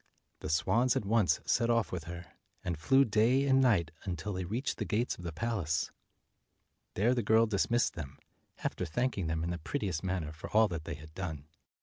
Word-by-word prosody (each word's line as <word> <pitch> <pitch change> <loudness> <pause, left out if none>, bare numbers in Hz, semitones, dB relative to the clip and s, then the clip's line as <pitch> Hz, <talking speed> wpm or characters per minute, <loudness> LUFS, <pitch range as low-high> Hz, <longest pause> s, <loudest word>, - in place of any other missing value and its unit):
The - - -5
swans 115 +10 +2
at - - -1
once 100 -7 +2
set 120 -1 +2
off 115 -2 +2
with 85 -4 -4
her, 85 0 -7 0.4
and 90 -3 -1
flew 135 - +4
day 115 +5 +3
and 135 -1 +4
night 95 -11 +3
until 90 +2 -4
they 90 -1 -3
reached 115 - -2
the - - 0
gates 115 +3 0
of 90 - -12
the 85 - -4
palace. 85 -4 -1 1.0
There 115 +6 +3
the 125 - 0
girl 110 +1 +4
dismissed 115 +3 +1
them, 70 -4 -7 0.5
after - - -2
thanking 95 +2 -1
them 80 0 -1
in 85 - -1
the 90 - -3
prettiest 95 - -3
manner 90 -5 -2
for 80 - -9
all 110 +1 +5
that 85 -2 -5
they - - -4
had 75 +1 -13
done. 80 -5 -5
95 Hz, 200 wpm, -32 LUFS, 80-115 Hz, 1.0 s, all